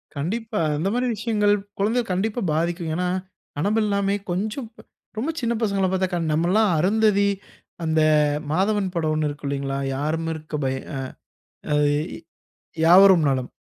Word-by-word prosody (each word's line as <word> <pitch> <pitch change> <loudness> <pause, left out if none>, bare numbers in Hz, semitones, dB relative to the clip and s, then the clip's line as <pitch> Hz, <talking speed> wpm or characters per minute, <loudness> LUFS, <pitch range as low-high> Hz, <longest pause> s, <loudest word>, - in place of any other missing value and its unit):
கண்டிப்பா. 215 +9 -3 0.2
அந்தமாரி 215 +10 0
விஷயங்கள், 210 -1 +1 0.3
குழந்தைய 225 +5 +1
கண்டிப்பா 205 +6 -1
பாதிக்கும். 170 +1 -1
ஏன்னா 180 +1 -1 0.5
அனபெல்லாமே 200 +1 +1 0.2
கொஞ்சம், 215 +7 -3 0.5
ரொம்ப 265 +9 -1
சின்ன 235 -1 0
பசங்கள 200 -3 +1
பாத்தா, 190 0 +1
கண் 165 -3 -1
நம்ம 165 +3 +1
எல்லாம் 215 0 +3
அருந்ததி, 205 +2 +3 0.6
அந்த 160 0 +1 0.5
மாதவன் 195 +3 +1
படம் 160 -2 0
1 155 0 0
இருக்கும் 145 0 -6
இல்லேங்களா! 140 -1 -2 0.2
யாரும் 160 +4 -2
இருக்க 155 -1 -7
பய 130 0 -1 0.2
ஆ - - -3 0.8
அது 150 0 +3 1.0
யாவரும் 185 0 +7
நலம். 130 -2 -1
190 Hz, 130 wpm, -23 LUFS, 155-210 Hz, 1.0 s, யாவரும்